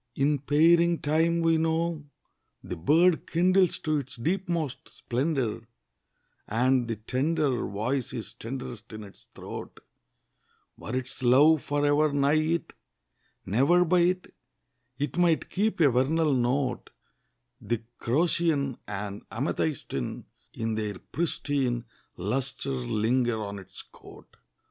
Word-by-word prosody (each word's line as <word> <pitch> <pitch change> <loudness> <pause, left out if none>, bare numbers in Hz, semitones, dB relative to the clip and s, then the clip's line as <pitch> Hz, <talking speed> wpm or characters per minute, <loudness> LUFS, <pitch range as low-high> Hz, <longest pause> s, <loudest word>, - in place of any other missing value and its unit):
In 145 +1 +2
pairing 165 +5 +4
time, 165 +2 +1
we 165 -1 +3
know, 165 0 0 0.6
the - - -5
bird 160 - +3
Kindles 185 +1 +3
to 155 -1 0
its 135 -1 -8
deepmost 170 0 -2
splendour, 130 -2 -2 0.8
And 125 +2 +2
the 115 - -2
tender 130 +4 0
Voice 120 +6 -2
is 115 -4 -6
tenderest 120 -2 -7
in 110 0 -7
its 100 - -14
throat: - - -8 1.0
Were 115 - -6
its 130 0 -4
love 140 +5 +5
for 145 0 -1
ever 145 +1 +3
nigh 140 0 +2
it, 165 +2 -1 0.7
Never 140 - +3
by 180 +2 +3
it, 180 +1 +1 0.6
It 145 +4 -2
might 170 -3 +2
keep 210 +2 0
a 145 -5 +5
vernal 145 +5 +2
note, 125 0 0 0.7
The 120 -1 -2 0.2
crocean 145 -1 +1
and 100 0 -5
amethystine 135 - -3 0.3
In 115 0 -2
their 105 -3 -3
pristine 140 - -2 0.3
Lustre 130 +8 -2
linger 120 -1 0
on 100 -1 -5
its 95 - -11
coat. - - -16
140 Hz, 120 wpm, -27 LUFS, 120-165 Hz, 1.0 s, love